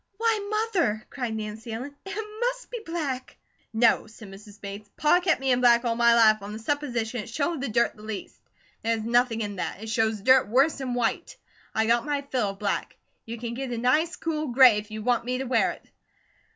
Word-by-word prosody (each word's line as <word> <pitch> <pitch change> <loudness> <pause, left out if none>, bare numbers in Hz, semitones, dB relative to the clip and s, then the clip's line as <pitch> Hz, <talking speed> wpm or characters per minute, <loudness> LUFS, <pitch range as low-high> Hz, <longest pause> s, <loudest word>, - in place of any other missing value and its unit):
"Why, 450 -1 +2
Mother!" 400 - 0
cried 245 -5 -3
Nancy 220 +1 -6
Ellen 255 +6 -6
"it 415 +3 -4
must - - -2
be 485 - -4
black!" 295 -7 -4 0.3
"No," 230 0 +3
said 215 -1 -12
Mrs. 205 +1 -13
Bates. 205 +1 -8
"Pa 305 +4 +4
kept 360 -4 +1
me 265 -1 0
in 250 0 +2
black 240 0 +5
all 230 -1 +1
my 235 0 +5
life 215 -2 +5
on 200 +1 -7
the - - -5
supposition 240 -2 -2
it 220 - -10
showed 300 +5 -2
the 275 - -2
dirt 235 +2 +1
the 210 - -15
least. 215 -2 -7 0.4
There's 225 -1 -1
nothing 235 0 +2
in 205 -2 -4
that. 195 - -4
It 220 - -6
shows 220 -1 0
dirt 260 +3 +5
worse 270 +8 +3
'an 255 -2 -2
white. 240 -2 -2 0.4
I 220 - +2
got 235 +1 +3
my 290 -1 -2
fill 255 -7 -1
of 195 - -7
black. 200 0 -2 0.3
You 230 +1 -5
can 235 0 -5
get 265 +2 -4
a 240 - -3
nice 300 +9 +2
cool 310 -3 -3
gray, 245 -4 +6
if 210 +1 -10
you 215 0 -6
want 245 0 +1
me 250 +1 -2
to 265 - -3
wear 255 0 +2
it." - - -17
240 Hz, 215 wpm, -26 LUFS, 220-280 Hz, 0.4 s, gray